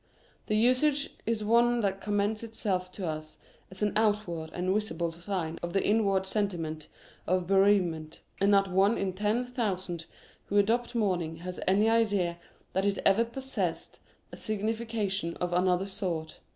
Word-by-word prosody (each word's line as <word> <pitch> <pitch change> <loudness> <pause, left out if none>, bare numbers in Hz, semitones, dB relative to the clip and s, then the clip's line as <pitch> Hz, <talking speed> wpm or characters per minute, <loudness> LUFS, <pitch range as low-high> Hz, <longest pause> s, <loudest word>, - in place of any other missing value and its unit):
The 215 - +1
usage 265 +5 +3 0.2
is 225 -2 0
one 235 +2 +4
that 195 -2 -1
commends 205 +1 0
itself 200 -5 -2
to 195 - -5
us 155 -1 -5 0.3
as 190 +2 -5
an 210 - +1
outward 205 -7 0
and 185 +1 -1
visible 170 -5 -1
sign 170 -1 -4
of 175 0 -4
the 195 - +1
inward 200 -3 +2
sentiment 175 -7 -2 0.4
of 185 0 +1
bereavement, 180 -5 +2 0.2
and 200 +1 +3
not 195 -1 +4
one 195 +4 +3
in 190 -2 -1
ten 210 +6 0
thousand 190 -9 -3 0.4
who 205 - 0
adopt 235 +4 +2
mourning 180 -7 0
has 180 0 -5
any 200 +4 +4
idea 205 -7 +2 0.3
that 190 +2 +1
it 200 -1 +1
ever 210 +4 +5
possessed 265 +3 -4 0.3
a - - -9
signification 215 -4 -2
of 180 0 -2
another 180 +1 +2
sort. 175 -5 -4
195 Hz, 150 wpm, -29 LUFS, 180-215 Hz, 0.4 s, ever